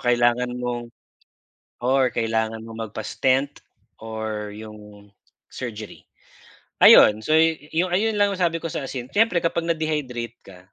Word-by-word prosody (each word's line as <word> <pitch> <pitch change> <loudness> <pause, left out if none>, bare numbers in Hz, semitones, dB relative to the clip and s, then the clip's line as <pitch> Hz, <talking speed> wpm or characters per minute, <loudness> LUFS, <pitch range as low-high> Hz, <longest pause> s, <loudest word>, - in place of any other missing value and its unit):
kailangan 120 0 +1
mong 120 -1 -4 0.9
or 130 +1 +2
kailangan 110 -1 -1
mong 115 -1 -7
magpa-stent 130 +6 -1 0.4
or 110 -1 -5
yung 105 -1 -12 0.4
surgery. 110 -4 -8 0.8
Ayun 105 +1 +8
so - - -1
ayun 165 +6 +1
lang 205 - +5
ang - - -8
sabi 165 -2 0
ko 165 - -3
sa 145 - -4
asin 125 -2 -6
siyempre 205 -2 +2
kapag 170 0 -1
na-dehydrate 150 -8 -2
ka 95 -2 -13
125 Hz, 125 wpm, -23 LUFS, 110-160 Hz, 0.9 s, Ayun